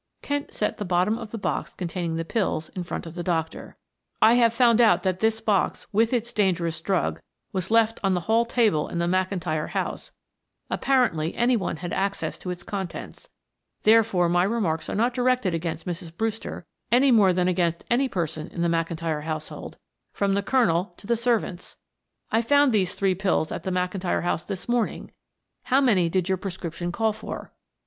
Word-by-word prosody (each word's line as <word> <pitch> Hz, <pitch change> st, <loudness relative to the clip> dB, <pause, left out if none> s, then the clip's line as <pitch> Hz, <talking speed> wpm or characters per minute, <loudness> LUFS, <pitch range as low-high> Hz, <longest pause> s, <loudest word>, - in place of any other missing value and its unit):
Kent 285 Hz, 0 st, -2 dB
set 210 Hz, -, -2 dB
the -, -, -3 dB
bottom 185 Hz, +3 st, +1 dB
of 225 Hz, -3 st, -7 dB
the 230 Hz, -, -5 dB
box 200 Hz, -, -3 dB
containing 170 Hz, -2 st, -3 dB
the 165 Hz, 0 st, -2 dB
pills 175 Hz, -5 st, -1 dB
in 185 Hz, -, -6 dB
front 175 Hz, -1 st, -5 dB
of 165 Hz, -, -8 dB
the 175 Hz, -, -5 dB
doctor. 165 Hz, -2 st, -3 dB, 0.4 s
"I 220 Hz, +1 st, +6 dB
have 235 Hz, -2 st, +5 dB
found 235 Hz, 0 st, +4 dB
out 180 Hz, -6 st, +4 dB
that 185 Hz, -1 st, 0 dB
this 220 Hz, 0 st, +1 dB
box, 210 Hz, -4 st, 0 dB
with 225 Hz, +2 st, +3 dB
its 240 Hz, -1 st, -1 dB
dangerous 175 Hz, -5 st, 0 dB
drug, 190 Hz, -3 st, -1 dB, 0.3 s
was 185 Hz, -1 st, -2 dB
left 225 Hz, 0 st, +3 dB
on 195 Hz, -1 st, +2 dB
the 180 Hz, -, -1 dB
hall 225 Hz, +7 st, +3 dB
table 225 Hz, -10 st, +1 dB
in -, -, -5 dB
the 170 Hz, -, +1 dB
McIntyre 180 Hz, -3 st, -1 dB
house; -, -, -3 dB, 0.6 s
apparently 220 Hz, -, +1 dB
any 245 Hz, +1 st, +3 dB
one 190 Hz, -6 st, -2 dB
had 175 Hz, -, -4 dB
access 195 Hz, +1 st, -2 dB
to 180 Hz, -, -6 dB
its 175 Hz, -1 st, -5 dB
contents, 190 Hz, -3 st, -6 dB, 0.5 s
therefore 215 Hz, -5 st, +4 dB
my 175 Hz, +1 st, +3 dB
remarks 190 Hz, -6 st, -1 dB
are -, -, -2 dB
not 235 Hz, +4 st, +2 dB
directed 250 Hz, -6 st, +1 dB
against 165 Hz, -1 st, -3 dB
Mrs. 170 Hz, -1 st, -6 dB
Brewster 225 Hz, 0 st, -3 dB, 0.3 s
any 255 Hz, +3 st, +5 dB
more 205 Hz, -5 st, +6 dB
than 180 Hz, 0 st, +1 dB
against 170 Hz, -2 st, 0 dB
any 260 Hz, +3 st, +3 dB
person 160 Hz, -6 st, -3 dB
in 170 Hz, -, -4 dB
the 170 Hz, -, +2 dB
McIntyre 165 Hz, -2 st, -1 dB
household, 155 Hz, -1 st, -6 dB, 0.4 s
from 200 Hz, -1 st, +1 dB
the 200 Hz, -, +1 dB
Colonel 195 Hz, -6 st, +1 dB
to -, -, -14 dB
the 235 Hz, -, +2 dB
servants. 230 Hz, -6 st, -1 dB, 0.5 s
I 225 Hz, -, +3 dB
found 285 Hz, +2 st, +4 dB
these 190 Hz, -4 st, +1 dB
three 195 Hz, -1 st, +2 dB
pills 185 Hz, -4 st, 0 dB
at -, -, -4 dB
the 190 Hz, -, -1 dB
McIntyre 180 Hz, 0 st, -1 dB
house 175 Hz, -1 st, -1 dB
this 195 Hz, -3 st, -6 dB
morning; 240 Hz, -2 st, -1 dB, 0.5 s
how 265 Hz, +1 st, +3 dB
many 200 Hz, -11 st, +3 dB
did 185 Hz, 0 st, 0 dB
your 190 Hz, -2 st, 0 dB
prescription 175 Hz, -2 st, -5 dB
call 220 Hz, +4 st, +1 dB
for?" 220 Hz, -, -8 dB
190 Hz, 185 wpm, -25 LUFS, 175-225 Hz, 0.6 s, I